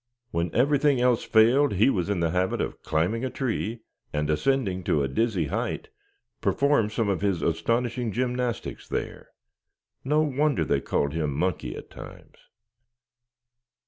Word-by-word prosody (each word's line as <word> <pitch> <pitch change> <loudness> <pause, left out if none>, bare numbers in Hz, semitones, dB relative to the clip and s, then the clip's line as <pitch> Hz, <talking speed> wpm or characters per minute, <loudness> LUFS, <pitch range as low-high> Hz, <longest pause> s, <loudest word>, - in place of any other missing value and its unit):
When 85 +1 -1
everything 140 +1 +3
else 125 -1 +2
failed 120 +5 +4
he 105 +7 +4
was 90 -4 -1
in 100 -4 0
the 85 -1 +1
habit 90 +2 0
of - - -3
climbing 90 +10 0
a 130 - -1
tree, 120 -3 -3 0.3
and 75 0 -1
ascending 100 - 0
to 75 - +2
a - - 0
dizzy 95 - 0
height, - - -3 0.5
perform 140 -6 +2
some 110 0 -1
of 95 -3 0
his 95 -6 0
astonishing 115 +8 0
gymnastics 125 0 -2
there. - - -5 0.7
No 150 +3 +2
wonder 150 0 +1
they - - +1
called 70 0 -1
him 80 -3 -1
"Monkey" 90 +3 -1
at - - -10
times. - - -12
110 Hz, 145 wpm, -26 LUFS, 85-130 Hz, 0.7 s, failed